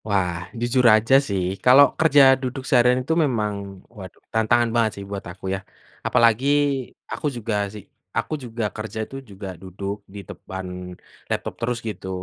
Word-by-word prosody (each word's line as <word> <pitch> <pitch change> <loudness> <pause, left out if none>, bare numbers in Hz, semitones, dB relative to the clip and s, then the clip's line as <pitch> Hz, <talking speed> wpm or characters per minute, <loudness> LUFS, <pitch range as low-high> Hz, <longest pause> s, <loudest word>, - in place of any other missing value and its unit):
Wah, 90 -4 -1
jujur 125 +2 +2
aja 110 +4 +1
sih. 95 -3 -1 0.2
Kalau 130 +3 +9
kerja 150 -3 +6 0.2
duduk 130 0 -4
seharian 125 0 +4
itu 160 - +1
memang 110 -6 -1 0.4
waduh 95 -3 -11
tantangan 115 +1 +3
banget 115 -2 +3
sih 100 - -6
buat 100 -1 -4
aku 95 +1 -12
yah. 95 0 -4 0.4
Apalagi 115 +1 +3 0.7
aku - - -5
juga 115 -1 -3 0.2
sih 105 -2 -9 0.3
aku - - -1
juga 115 -1 -4
kerja 110 0 -5
itu 135 - -12
juga 100 0 -8
duduk 100 +1 -5 0.2
di 100 - -7
depan 95 0 -7 0.6
laptop - - -2
terus 120 +1 -1
gitu, 95 -3 -6
110 Hz, 155 wpm, -23 LUFS, 100-125 Hz, 0.7 s, Kalau